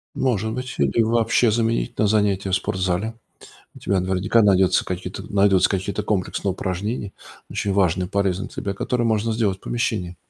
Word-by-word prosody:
Может 110 Hz, -4 st, 0 dB
быть, 125 Hz, +1 st, -5 dB
или 70 Hz, +10 st, +2 dB
вообще 115 Hz, +1 st, +2 dB
заменить 115 Hz, +1 st, 0 dB
на 110 Hz, -, +2 dB
занятия 100 Hz, -2 st, +1 dB
в -, -, +4 dB
спортзале. 95 Hz, +3 st, -1 dB, 0.6 s
У -, -, -12 dB
тебя 95 Hz, -1 st, 0 dB
наверняка 95 Hz, +5 st, +2 dB
найдется 95 Hz, -2 st, +4 dB
какие-то, 90 Hz, +1 st, -5 dB
найдутся 100 Hz, -2 st, +4 dB
какие-то 100 Hz, +2 st, -2 dB
комплексные 100 Hz, -1 st, -1 dB
упражнения, 100 Hz, +3 st, -3 dB, 0.4 s
очень 100 Hz, -, -2 dB
важные 90 Hz, -2 st, +2 dB
и 95 Hz, -, -16 dB
полезные 100 Hz, -1 st, 0 dB
тебе, 100 Hz, -, -4 dB
которые 120 Hz, +4 st, -1 dB
можно 110 Hz, 0 st, +1 dB
сделать 105 Hz, -4 st, 0 dB
в -, -, -39 dB
помещении. 105 Hz, -7 st, -2 dB
100 Hz, 165 wpm, -22 LUFS, 95-110 Hz, 0.6 s, в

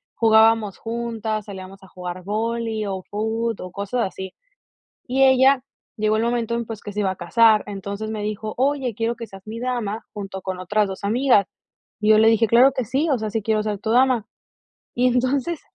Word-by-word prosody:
jugábamos 220 Hz, -2 st, +4 dB
juntas, 225 Hz, -2 st, -3 dB
salíamos 195 Hz, -1 st, -9 dB
a 190 Hz, -, -15 dB
jugar 180 Hz, 0 st, -7 dB
vóley, 225 Hz, +1 st, -2 dB
o 190 Hz, -1 st, -3 dB
fut, 220 Hz, +1 st, -2 dB
o 185 Hz, -, -7 dB
cosas 205 Hz, +6 st, -3 dB
así. 190 Hz, 0 st, -7 dB, 0.7 s
Y 265 Hz, +2 st, +2 dB
ella 265 Hz, 0 st, +5 dB, 0.3 s
llegó 215 Hz, -1 st, +1 dB
el 220 Hz, -, +1 dB
momento 235 Hz, -1 st, 0 dB
en 235 Hz, -1 st, -2 dB
pues 220 Hz, -2 st, -7 dB
que 205 Hz, -, -7 dB
se 210 Hz, -, -4 dB
iba 195 Hz, -2 st, +1 dB
a -, -, -6 dB
casar, 220 Hz, +5 st, +4 dB
entonces 200 Hz, +2 st, -5 dB
me 215 Hz, -1 st, -4 dB
dijo: 215 Hz, +1 st, -4 dB
"Oye, 265 Hz, -2 st, 0 dB
quiero 230 Hz, +2 st, -1 dB
que 230 Hz, -1 st, -8 dB
seas 195 Hz, -1 st, -13 dB
mi 225 Hz, +2 st, -6 dB
dama 235 Hz, -4 st, -3 dB
junto 195 Hz, -2 st, -7 dB
con 185 Hz, -1 st, -5 dB
otras 205 Hz, +2 st, 0 dB
2 190 Hz, +1 st, -6 dB
amigas, 235 Hz, -2 st, +3 dB, 0.6 s
y 215 Hz, 0 st, +2 dB
yo 215 Hz, -, +7 dB
le 220 Hz, -, +6 dB
dije: 225 Hz, 0 st, +4 dB
"Claro 240 Hz, +5 st, +6 dB
que 255 Hz, -2 st, -2 dB
sí, 275 Hz, +8 st, 0 dB
o 265 Hz, -, +2 dB
sea, 215 Hz, -, -3 dB
sí 225 Hz, 0 st, -2 dB
quiero 215 Hz, 0 st, 0 dB
ser 210 Hz, -2 st, -3 dB
tu 220 Hz, -, -3 dB
dama". 250 Hz, -2 st, +3 dB, 0.7 s
Y 250 Hz, +1 st, +3 dB
entonces 260 Hz, +6 st, 0 dB
220 Hz, 200 wpm, -22 LUFS, 205-235 Hz, 0.7 s, yo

